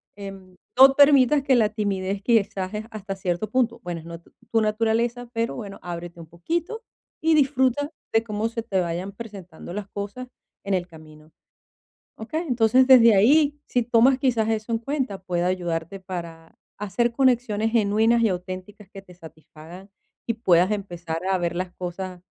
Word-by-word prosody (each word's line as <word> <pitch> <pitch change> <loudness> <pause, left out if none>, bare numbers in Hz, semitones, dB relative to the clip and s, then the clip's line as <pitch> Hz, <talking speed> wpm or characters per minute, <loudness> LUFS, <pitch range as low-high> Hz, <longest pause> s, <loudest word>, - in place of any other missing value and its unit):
Em, 195 -2 -10 0.2
no 270 +1 +8
permitas 285 -1 +5
que 270 -2 +3
la 220 -3 +3
timidez, 200 -2 -2
quizá 200 -4 +1
es 215 +1 -5
hasta 205 -2 -6
cierto 190 +2 -3
punto, 235 -1 0
bueno, 175 -2 -5
es - - -16
no 170 0 -8
tu - - -25 0.2
tu 225 - +3
naturaleza, 230 +3 0
pero 230 +1 -2
bueno, 200 -4 -8
ábrete 170 -1 -7
un 165 - -11
poquito 335 - -4 0.4
y 320 0 +3
disfruta 275 0 +2 0.2
de 225 0 +3
cómo 215 0 -2
se 230 0 -4
te 195 -4 -1
vayan 175 +3 -3
presentando 195 -6 -10
las 205 -1 -5
cosas 205 +5 -6 0.4
en 200 0 -2
el 180 -1 -1
camino, 155 -1 -16 0.9
¿okey? 305 +9 -4
Entonces, 250 +1 +3
desde 235 -5 +7
ahí, 290 +7 +4
si 245 - 0
tomas 240 +3 +4
quizás 230 -5 +1
eso 220 +1 -2
en 225 - 0
cuenta, 260 -6 -3
puede 175 -2 -2
ayudarte 175 0 -2
para 170 -3 -8 0.2
hacer 220 +4 0
conexiones 235 -4 +1
genuinas 225 +1 +3
y 220 - +3
auténticas 185 +2 -7
que 195 -1 -11
te 180 -2 -17
satisfagan 165 +2 -14 0.4
y 230 - +1
puedas 185 -3 +3
empezar 175 -5 -4
a 190 -1 +2
ver 175 -1 -2
las 180 0 -3
cosas, 180 0 -6
210 Hz, 170 wpm, -24 LUFS, 180-235 Hz, 0.9 s, no